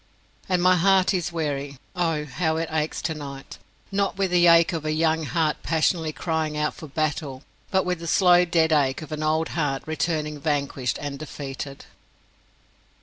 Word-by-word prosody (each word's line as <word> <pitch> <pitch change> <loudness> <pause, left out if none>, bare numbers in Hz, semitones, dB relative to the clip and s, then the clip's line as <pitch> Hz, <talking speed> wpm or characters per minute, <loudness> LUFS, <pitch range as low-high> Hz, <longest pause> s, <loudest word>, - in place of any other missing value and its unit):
And 180 -1 +2
my 185 0 +5
heart 190 +2 +4
is 175 -2 -1
weary. 145 -4 -3 0.2
Oh, 165 -4 0
how 160 +3 -1
it 165 0 -2
aches 155 -1 -2
tonight 145 -4 -6 0.3
not 195 -1 0
with 195 -2 0
the 175 -1 +5
ache 170 +1 +6
of 160 -2 -3
a 155 - -1
young 160 0 +1
heart 160 -1 0
passionately 160 0 +1
crying 160 -1 -2
out 150 0 0
for 160 - -10
battle, 145 -2 -2 0.3
but 190 -1 +1
with 180 -2 -1
the 170 - -6
slow 180 0 +5
dead 165 -2 +2
ache 140 -1 +2
of 155 - -11
an 155 0 -4
old 155 +1 +1
heart 145 -5 -1
returning 155 -1 -2
vanquished 140 -4 -1
and 145 -1 -5
defeated! 140 -2 -7
160 Hz, 170 wpm, -24 LUFS, 150-170 Hz, 0.3 s, ache